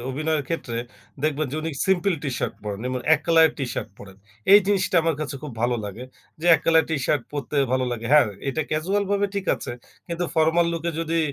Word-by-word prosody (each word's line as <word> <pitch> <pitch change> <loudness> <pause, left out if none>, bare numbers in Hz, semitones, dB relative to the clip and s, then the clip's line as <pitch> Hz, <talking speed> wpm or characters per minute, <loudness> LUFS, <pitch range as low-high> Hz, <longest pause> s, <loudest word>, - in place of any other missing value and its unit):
অভিনয়ের 155 +2 -1
ক্ষেত্রে 120 -8 -3 0.4
দেখবেন 155 -1 0
যে - - -2
উনি 165 - -2 0.2
সিম্পেল 190 -1 +2
টি-শার্ট 135 -4 -2
পরেন। 100 -1 -4
এবং 130 0 -2
১ 145 - -2
কলার 165 -1 +6
টি-শার্ট 135 -3 -3
পরেন। 95 -2 -12 0.4
এই 205 - +11
জিনিসটা 190 -3 +1
আমার 165 -1 +1
কাছে 150 -2 -4
খুব 150 -3 -6
ভালো 120 0 +2
লাগে। 105 +5 -7 0.4
যে 175 - -3
এক - - -10
কালার 160 -1 +5
টি-শার্ট 145 -2 0
পরতে 145 0 -4 0.2
ভালো 130 0 +2
লাগে। 115 -1 -5
হ্যাঁ 150 -4 +7 0.2
এটা 145 +4 -1
casual 185 +7 0
ভাবে 205 0 +2
ঠিক 200 -2 -3
আছে। - - -6 0.4
কিন্তু 170 +1 -2
formal 160 +1 +3
look 165 -1 -4
এ - - +1
যদি 165 0 -1
155 Hz, 200 wpm, -24 LUFS, 130-170 Hz, 0.4 s, এই